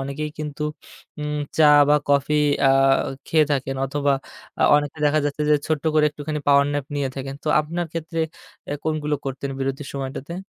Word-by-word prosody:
অনেকেই 140 Hz, +3 st, -4 dB
কিন্তু 150 Hz, -1 st, -5 dB, 0.6 s
উম 150 Hz, 0 st, -2 dB, 0.2 s
চা 155 Hz, -, +6 dB, 0.2 s
বা 150 Hz, -, +6 dB
কফি 140 Hz, +1 st, +2 dB, 0.3 s
আ -, -, +5 dB, 0.6 s
খেয়ে 155 Hz, -1 st, +4 dB
থাকেন, 135 Hz, -1 st, -2 dB
অথবা 140 Hz, +1 st, 0 dB, 0.5 s
আ -, -, +4 dB
অনেকে 145 Hz, +1 st, -2 dB
দেখা 150 Hz, +1 st, +2 dB
যাচ্ছে 145 Hz, +1 st, -2 dB
যে -, -, +6 dB
ছোট্ট 155 Hz, -2 st, -1 dB
করে 155 Hz, -1 st, +4 dB
একটুখানি 150 Hz, +1 st, -5 dB
পাওয়ার 140 Hz, 0 st, +6 dB
ন্যাপ 145 Hz, -2 st, -2 dB
নিয়ে 140 Hz, -2 st, -1 dB
থাকেন। 135 Hz, 0 st, -5 dB
তো -, -, -2 dB
আপনার 170 Hz, +3 st, -3 dB
ক্ষেত্রে 165 Hz, 0 st, -3 dB, 0.5 s
অ্যা 145 Hz, -, -3 dB
কোনগুলো 155 Hz, -1 st, -1 dB
করতেন 135 Hz, 0 st, -4 dB
বিরতির 135 Hz, +1 st, -3 dB
সময়টাতে? 135 Hz, +3 st, -5 dB
145 Hz, 170 wpm, -22 LUFS, 140-155 Hz, 0.6 s, চা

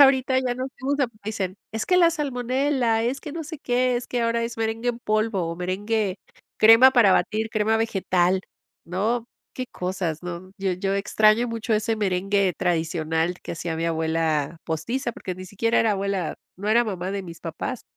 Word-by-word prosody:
Ya -, -, +12 dB
ahorita 265 Hz, -1 st, +3 dB
ya 255 Hz, -2 st, 0 dB
no 255 Hz, +1 st, -3 dB
hacemos, 265 Hz, +1 st, -3 dB, 0.3 s
dicen: 200 Hz, -4 st, -3 dB, 0.2 s
"Es 220 Hz, 0 st, -2 dB
que 360 Hz, -, +4 dB
la 340 Hz, -2 st, +6 dB
salmonela, 260 Hz, -4 st, 0 dB
es 250 Hz, +4 st, -1 dB
que 300 Hz, -, -7 dB
no 325 Hz, 0 st, -5 dB
sé 305 Hz, +1 st, -7 dB
qué, 250 Hz, -1 st, +1 dB
es 240 Hz, -, -4 dB
que 245 Hz, -1 st, -1 dB
ahora 230 Hz, 0 st, +1 dB
es 230 Hz, 0 st, -4 dB
merengue 225 Hz, +1 st, -1 dB
en 240 Hz, -1 st, -1 dB
polvo 215 Hz, -3 st, 0 dB
o 165 Hz, 0 st, -3 dB
merengue, 195 Hz, +2 st, -1 dB, 0.4 s
crema 225 Hz, +4 st, +8 dB
para 225 Hz, -7 st, +6 dB
batir, 220 Hz, +1 st, +1 dB
crema 220 Hz, +1 st, +2 dB
vegetal". 190 Hz, -4 st, +1 dB, 0.5 s
¿No? 220 Hz, +7 st, -1 dB, 0.3 s
Qué 255 Hz, -, -4 dB
cosas, 180 Hz, -6 st, -3 dB
¿no? 180 Hz, +1 st, -6 dB
Yo 195 Hz, -1 st, 0 dB
yo 195 Hz, +2 st, -1 dB
extraño 215 Hz, +3 st, +3 dB
mucho 230 Hz, -1 st, -1 dB
ese 215 Hz, +1 st, +1 dB
merengue 195 Hz, -2 st, +1 dB
tradicional 165 Hz, 0 st, 0 dB
que -, -, -5 dB
hacía 165 Hz, -1 st, -4 dB
mi 165 Hz, -, -2 dB
abuela 160 Hz, -2 st, 0 dB
postiza, 235 Hz, -, -2 dB
porque 185 Hz, -4 st, -6 dB
ni 185 Hz, -, -9 dB
siquiera 220 Hz, +5 st, 0 dB
era 225 Hz, -, +3 dB
abuela, 195 Hz, -3 st, -2 dB, 0.2 s
no 200 Hz, +3 st, -4 dB
era 235 Hz, +2 st, +5 dB
mamá 185 Hz, -3 st, -3 dB
de 200 Hz, 0 st, -3 dB
mis 170 Hz, -3 st, -10 dB
papás. 170 Hz, +8 st, -5 dB
215 Hz, 185 wpm, -24 LUFS, 180-240 Hz, 0.5 s, Ya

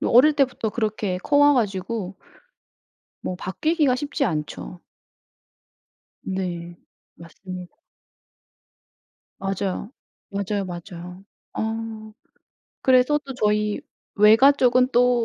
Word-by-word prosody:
그 -, -, 0 dB
어릴 265 Hz, +6 st, +6 dB
때부터 260 Hz, -5 st, +1 dB
그렇게 210 Hz, -4 st, -2 dB
커 285 Hz, +10 st, 0 dB
와 290 Hz, 0 st, +7 dB
가지고 200 Hz, -3 st, -2 dB, 1.1 s
뭐 180 Hz, -, -4 dB
바뀌기가 290 Hz, -, +1 dB
쉽지 285 Hz, +1 st, -2 dB
않죠. 160 Hz, 0 st, -4 dB, 1.4 s
네. 175 Hz, -2 st, -4 dB, 0.4 s
맞습니다. 180 Hz, +1 st, -10 dB, 1.6 s
맞아요. 195 Hz, +1 st, -3 dB, 0.4 s
맞아요, 200 Hz, 0 st, -2 dB
맞아요. 180 Hz, +1 st, -9 dB, 0.3 s
어. 220 Hz, -1 st, -4 dB, 0.7 s
그래서 260 Hz, +3 st, +4 dB
또 270 Hz, -, -7 dB
저희 210 Hz, +1 st, +1 dB, 0.3 s
외가 220 Hz, +7 st, +7 dB
쪽은 255 Hz, -2 st, +3 dB
또 245 Hz, -1 st, +4 dB
215 Hz, 195 characters per minute, -23 LUFS, 185-250 Hz, 1.6 s, 와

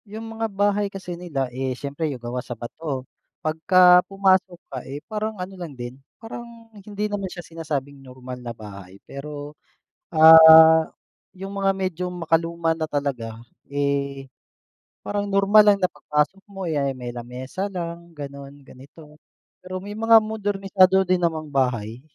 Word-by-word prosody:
Yung 225 Hz, +2 st, -8 dB
mga 225 Hz, 0 st, -3 dB
bahay 205 Hz, 0 st, +1 dB
kasi 190 Hz, -2 st, -7 dB
nila, 170 Hz, -6 st, -3 dB
eh, 130 Hz, 0 st, -3 dB
siyempre 145 Hz, +3 st, -4 dB
yung 135 Hz, -, -5 dB
gawa 120 Hz, +1 st, -4 dB
sa 120 Hz, -2 st, -8 dB
bato. 135 Hz, +2 st, -6 dB, 0.4 s
Pagka 180 Hz, +3 st, +5 dB
pumasok 190 Hz, -2 st, +2 dB
ka, 130 Hz, -2 st, -6 dB
eh, 135 Hz, +3 st, -8 dB
parang 215 Hz, 0 st, -4 dB
ano 185 Hz, +1 st, -6 dB
lang 170 Hz, -7 st, -9 dB
din, 120 Hz, +1 st, -7 dB, 0.2 s
parang 230 Hz, 0 st, -10 dB
hindi 205 Hz, 0 st, -5 dB
naman 205 Hz, -2 st, -3 dB
siya 175 Hz, -1 st, -9 dB
sinasabing 145 Hz, -4 st, -5 dB
normal 130 Hz, -1 st, -10 dB
na 120 Hz, -, -7 dB
bahay, 100 Hz, -4 st, -11 dB
pero, 145 Hz, +1 st, -8 dB, 0.6 s
ah, 160 Hz, 0 st, +9 dB, 0.5 s
yung 195 Hz, +1 st, -8 dB
mga 195 Hz, 0 st, +2 dB
medyo 185 Hz, -2 st, -3 dB
makaluma 165 Hz, -1 st, 0 dB
na 160 Hz, -, -2 dB
talaga. 140 Hz, -7 st, -3 dB, 0.4 s
Eh, 140 Hz, -1 st, -2 dB, 0.8 s
parang 205 Hz, 0 st, -2 dB
normal 200 Hz, +2 st, +5 dB
lang 205 Hz, -1 st, +5 dB
na 180 Hz, -1 st, 0 dB
pagpasok 150 Hz, +6 st, -1 dB
mo, 195 Hz, -1 st, -7 dB
eh, 160 Hz, -4 st, -1 dB
ah, 140 Hz, -, 0 dB
may 125 Hz, -1 st, -6 dB
lamesa 125 Hz, +10 st, -6 dB
lang 170 Hz, -2 st, -7 dB
gano'n, 140 Hz, -1 st, -9 dB
ganito. 150 Hz, +4 st, -16 dB, 0.4 s
Pero 185 Hz, 0 st, -7 dB
may 200 Hz, +2 st, -7 dB
mga 225 Hz, +1 st, +5 dB
modernisado 195 Hz, -3 st, +2 dB
din 185 Hz, -1 st, +1 dB
namang 160 Hz, -3 st, -2 dB
bahay. 120 Hz, -4 st, -1 dB
165 Hz, 150 wpm, -23 LUFS, 140-195 Hz, 0.8 s, ah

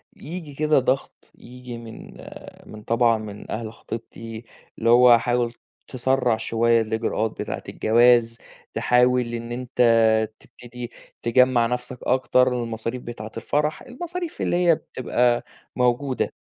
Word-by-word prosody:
ييجي 160 Hz, -2 st, -8 dB
كده 155 Hz, -1 st, +3 dB
ضَغْط، 130 Hz, +1 st, 0 dB, 0.2 s
ييجي 125 Hz, -1 st, -10 dB
من 115 Hz, -1 st, -11 dB, 0.5 s
من 105 Hz, 0 st, -11 dB
طبعًا 115 Hz, -1 st, +2 dB
من 105 Hz, -1 st, -9 dB
أهل 110 Hz, 0 st, -4 dB
خطيبتي 115 Hz, 0 st, -8 dB, 0.3 s
اللي 115 Hz, -, 0 dB
هو 120 Hz, 0 st, +7 dB
حاول 120 Hz, 0 st, 0 dB, 0.3 s
تسرّع 130 Hz, -2 st, +1 dB
شوية 115 Hz, +1 st, +2 dB
الإجراءات 110 Hz, 0 st, -1 dB
بتاعة -, -, -5 dB
الجواز، 115 Hz, 0 st, +3 dB, 0.4 s
تحاول 125 Hz, -1 st, +2 dB
إن 115 Hz, 0 st, -5 dB
أنت 125 Hz, +1 st, -7 dB, 0.6 s
تبتدي 120 Hz, 0 st, -10 dB, 0.3 s
تجمّع 125 Hz, 0 st, +4 dB
نَفْسك 125 Hz, +1 st, -4 dB
أكتر 130 Hz, 0 st, +3 dB, 0.2 s
المصاريف 115 Hz, +2 st, -4 dB
بتاعة 110 Hz, -2 st, -7 dB
الفرح، 150 Hz, +6 st, -1 dB
المصاريف 345 Hz, +6 st, -6 dB
اللي -, -, 0 dB
هي 165 Hz, -, +6 dB
بتبقى 125 Hz, -3 st, 0 dB, 0.3 s
موجودة. 125 Hz, +2 st, 0 dB
120 Hz, 120 wpm, -23 LUFS, 115-130 Hz, 0.6 s, هو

